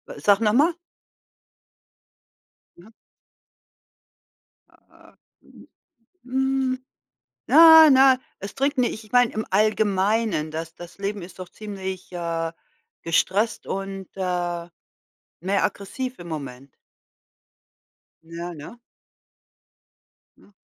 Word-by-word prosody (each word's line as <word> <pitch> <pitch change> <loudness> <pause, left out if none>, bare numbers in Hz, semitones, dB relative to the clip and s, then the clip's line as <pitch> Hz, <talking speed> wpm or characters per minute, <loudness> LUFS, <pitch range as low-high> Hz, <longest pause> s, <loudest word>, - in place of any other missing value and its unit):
Wa - - -10
sag 200 +7 +3
noch 210 -2 +2
mal. 300 +8 +3 2.0
Mhm. 185 +6 -17 1.8
Ah, - - -23 0.3
mhm, - - -18 0.6
mm, 265 0 -1 0.7
na, 320 -1 +9
na, 265 -1 +6 0.2
es 200 +1 -7
Trinken 275 0 0
nicht. 225 -2 -3
Ich 215 - -20
meine, 245 -1 +4
im 220 - -4
Allgemeinen, 205 -4 +1
das 165 +1 -6
das 175 +2 -12
Leben 200 0 -4
ist 180 +2 -12
doch 185 -1 -8
ziemlich, 190 -3 -7
äh, 165 -2 -3 0.5
gestresst 195 +6 0
und, 195 -1 -5
äh, 175 -2 -3 0.7
mehr 195 +4 0
aggressiv 255 +6 -4
im 175 - -10
Moment. 140 -4 -8 1.5
Ja, 170 +2 -7
ne? 155 +9 -11 1.6
Ne? - - -23
195 Hz, 100 wpm, -23 LUFS, 175-235 Hz, 2.0 s, na